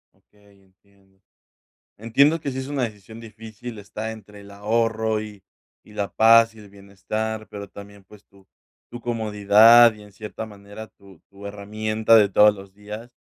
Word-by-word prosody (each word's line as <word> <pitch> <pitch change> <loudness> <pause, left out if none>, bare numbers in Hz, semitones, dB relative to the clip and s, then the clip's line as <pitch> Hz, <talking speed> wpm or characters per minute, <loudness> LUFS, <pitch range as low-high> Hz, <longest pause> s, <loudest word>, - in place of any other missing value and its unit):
Okey, 100 -1 -27
entiendo, 95 0 -31 0.8
entiendo 140 +9 +2
que 145 - -4
sí 130 - -7
es 130 0 -5
una 145 -2 -3
decisión 110 -1 -8
difícil, 110 +1 -11
está 105 +2 -7
entre 105 -2 -13
el 100 - -15
ahorro 110 +1 -1
y 105 -3 -11 0.4
y 105 - -18
la 100 -1 -4
paz 115 0 +5
y - - -15
el 105 -1 -15
bienestar, 105 +2 -6
pero 100 -1 -9
también, 100 0 -13
pues, 105 +2 -19
tu 100 -1 -24 0.5
tu 120 - -8
comodidad 110 0 +5
y, 105 - -16
en 105 0 -16
cierta 105 +2 -8
manera, 105 +1 -12
tu 95 -5 -20
tu 100 +1 -14
herramienta 110 +2 0
de 105 -2 +6
todos 105 +2 +5
los 95 -1 -14
días, 105 +4 -10
105 Hz, 165 wpm, -22 LUFS, 100-110 Hz, 0.8 s, de